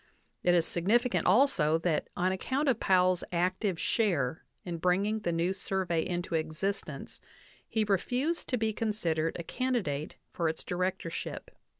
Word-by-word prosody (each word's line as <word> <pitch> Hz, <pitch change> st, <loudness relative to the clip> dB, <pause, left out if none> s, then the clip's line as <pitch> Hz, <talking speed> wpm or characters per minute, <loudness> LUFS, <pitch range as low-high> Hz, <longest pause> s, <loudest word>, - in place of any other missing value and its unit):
It 175 Hz, 0 st, +4 dB
is 170 Hz, -2 st, +3 dB
significant 230 Hz, +8 st, +1 dB
also 180 Hz, -, +4 dB
that 165 Hz, -2 st, 0 dB
on 185 Hz, +1 st, +2 dB
account 265 Hz, +10 st, -1 dB
of 250 Hz, -4 st, +3 dB
Powell's 185 Hz, -1 st, +3 dB
active 180 Hz, +1 st, 0 dB
share 160 Hz, -, 0 dB, 0.2 s
in 175 Hz, -2 st, -3 dB
bringing 195 Hz, +5 st, +2 dB
the 175 Hz, -5 st, -1 dB
new 170 Hz, +3 st, +1 dB
Survey 185 Hz, -4 st, -1 dB
into 175 Hz, -1 st, -3 dB
existence 160 Hz, +6 st, -3 dB, 0.5 s
he 220 Hz, -, +1 dB
refused 250 Hz, -, 0 dB
to 250 Hz, -, +1 dB
be 220 Hz, -1 st, 0 dB
considered 175 Hz, -8 st, -1 dB
a 170 Hz, -, -5 dB
candidate 195 Hz, -, -2 dB, 0.2 s
for 165 Hz, -2 st, +1 dB
its 160 Hz, -, -5 dB
directorship. 180 Hz, -1 st, -3 dB
185 Hz, 140 wpm, -30 LUFS, 170-215 Hz, 0.5 s, It